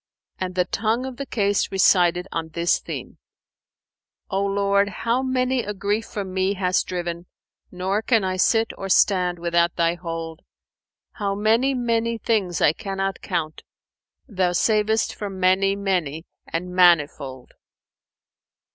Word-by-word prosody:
And 185 -1 -4
the 180 -1 +2
tongue 225 +6 -1
of 260 -2 -7
the 275 - -5
case 205 -4 0
recited 180 -2 +3
on 165 -1 -3
this 170 +2 +1
theme, - - -8 1.1
"O 195 +1 0
Lord, 200 0 +1
how 235 +5 -1
many 255 -1 0
a 210 -2 -5
grief 205 +3 -1
from 195 -3 -5
me 190 +1 0
hast 185 -1 0
driven 175 -1 -4 0.2
* - - -70
Nor 190 +3 -1
can 225 -2 +2
I 185 0 -1
sit 225 +4 +2
or 195 - -5
stand 180 -2 +3
without 170 0 +1
Thy 170 -1 +2
hold: 165 -1 -6 0.7
How 200 -2 -2
many 225 +6 +2
many 230 -1 0
things 205 -6 -1
I 150 - +5
cannot 195 -1 -4
count, 160 -4 -3 0.4
* - - -65
Thou 185 -6 0
sav'st 220 +3 +1
from 195 -2 -6
many 190 +2 +3
many 180 -6 -2 0.2
and 180 +2 -4
manifold!" 150 -7 +2
195 Hz, 145 wpm, -23 LUFS, 175-215 Hz, 1.1 s, I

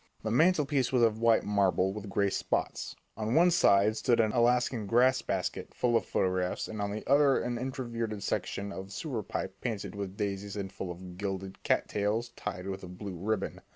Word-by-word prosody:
The 110 - -1
mantelpiece 150 -2 +3
was 125 -2 +3
of 110 -1 +3
white 115 -1 +4
marble 95 -2 +2
with 105 -1 -7
gray 100 0 +1
spots; - - -2 0.2
on 110 +3 -1
one 175 +2 +6
side 100 - +5
of 110 - +3
it - - -8
stood 115 +2 +2
an 110 -2 +3
Alaskan 120 -2 +2
"grass 125 +4 +4
basket" - - -3
full 120 -1 +1
of 115 - +1
photographs, 90 -1 0
and 110 -1 -5
on 100 - -1
the 105 +1 -5
other 140 0 +5
an 120 0 -2
inverted 115 -5 -3
section 100 0 -2
of 95 0 -6
a - - -18
sewer 115 - -3
pipe - - -5
painted 110 -5 -3
with 100 -1 -5
daisies 100 -1 -3
and 100 -2 -4
full 95 - -5
of 90 +1 -8
gilded 95 -1 -4
cat - - +1
tails 105 +3 -1
tied 105 -5 -6
with 95 -1 -4
a 95 - -8
blue 90 +1 -7
ribbon. 100 +3 -2
105 Hz, 205 wpm, -30 LUFS, 100-120 Hz, 0.2 s, one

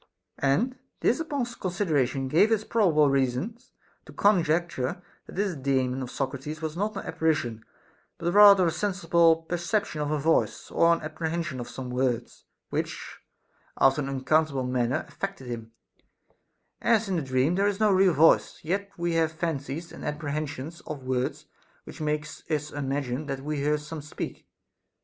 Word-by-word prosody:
And 235 - +1 0.2
this 245 - +2
upon 290 -6 -1
consideration 160 - -1
gave 170 +11 +4
us 220 -1 +2
probable 175 -11 +3
reasons 135 - -1 0.4
to - - -10
conjecture 170 -8 +1 0.3
that - - -11
this 195 -2 0
Daemon 130 -2 0
of 125 - -5
Socrates 140 +3 -4
was 160 0 -4
not 205 +3 -2
an - - -4
apparition, 120 -9 -1 0.5
but 170 +1 -1
rather 200 -2 +8
a 165 - +2
sensible 170 -4 +2
perception 175 0 -1
of 145 - -1
a 155 - +1
voice, 160 +3 +1
or 170 - +4
an 170 - +2
apprehension 160 -1 -3
of 120 - -6
some 130 -1 -6
words, 125 -2 -2 0.3
which - - -4 0.6
after 135 +2 +4
an 135 - -3
unac 135 -1 -4
countable 155 -4 +2
manner 125 -1 0
affected 195 -8 -5
him; 115 -2 -6 1.1
as 225 -2 +3
in 185 -3 0
a - - -2
dream 130 +3 +1
there 200 +3 +2
is 205 0 -1
no 215 -1 +4
real 190 -2 +5
voice, 160 +3 +4
yet 200 +5 -1
we 170 0 -1
have 165 -1 +2
fancies 160 0 -4
and - - -10
apprehensions 150 +1 -4
of 145 -3 -6
words 130 0 -2 0.4
which - - -10
make 150 0 0 0.2
us 150 -1 -1
imagine 140 0 -2
that 135 -1 -3
we 150 +1 -2
hear 150 +2 +1
some 150 +1 -7
speak. 150 - -7
155 Hz, 160 wpm, -27 LUFS, 135-180 Hz, 1.1 s, rather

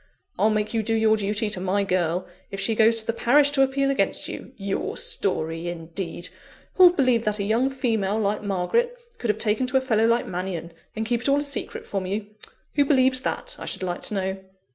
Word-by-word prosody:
I'll 215 - +4
make 215 0 -1
you 225 - +1
do 225 +1 0
your 220 0 +4
duty 210 +1 -1
to 200 - -1
my 195 +2 +1
girl, 180 -2 0 0.2
if 195 - -6
she 225 - +1
goes 225 +1 +4
to - - -14
the 230 - -1
parish 285 +5 +4
to 280 -2 +2
appeal 275 +1 +2
against 275 - +1
you! - - -8
Your 195 -1 -3
story 165 -3 -1
indeed! 170 +1 -5 0.4
Who'll 365 -1 +8
believe 255 -9 +2
that 210 0 0
a 200 - -2
young 230 +6 +2
female, 225 -6 0
like 210 -1 0
Margaret, 210 - 0 0.2
could 240 - -3
have 210 - +2
taken 220 +3 +1
to 260 +1 +2
a - - +5
fellow 225 -3 +2
like 235 +1 +2
Mannion? 175 -2 -5 0.2
and 220 0 -2
kept 235 +1 0
it - - +3
all 280 - +4
a 290 - 0
secret 285 -1 -4
from 195 -2 -3
you? 200 +2 -2 0.5
Who 290 - +4
believes 260 -2 +3
that, - - -3
I - - -7
should - - -2
like 175 -1 -3
to - - -1
know?" 190 0 -1
215 Hz, 220 wpm, -24 LUFS, 195-255 Hz, 0.5 s, Who'll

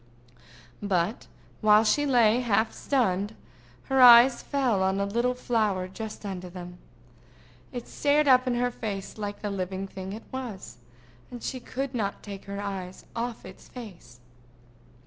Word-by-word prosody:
But 195 +1 -1 0.3
while 215 0 +6
she 290 +6 +2
lay 240 -3 +4
half 220 -2 +1
stunned, 210 -6 0 0.5
her 270 -1 +2
eyes 240 +1 +9
fell 255 -8 0
on 190 +1 +1
a 200 - +1
little 235 +5 0
flower 215 -7 0
just 215 +3 -8
under 185 -2 -5
them. 180 0 -9 0.9
It 245 -2 -6
stared 290 +1 +2
up 255 -1 +5
in 245 - +1
her 245 +1 0
face 210 -3 -6
like 205 0 -5
the 205 - -2
living 190 0 -3
thing 190 0 -7
it 220 - -8
was, 230 - -7 0.5
and 245 -1 -9
she 255 - -3
could 265 +2 -5
not 205 -5 -3
take 200 -2 -8
her 200 0 -6
eyes 190 -2 -6
off 235 0 -4
its - - -12
face. 175 - -11
215 Hz, 150 wpm, -27 LUFS, 195-245 Hz, 0.9 s, eyes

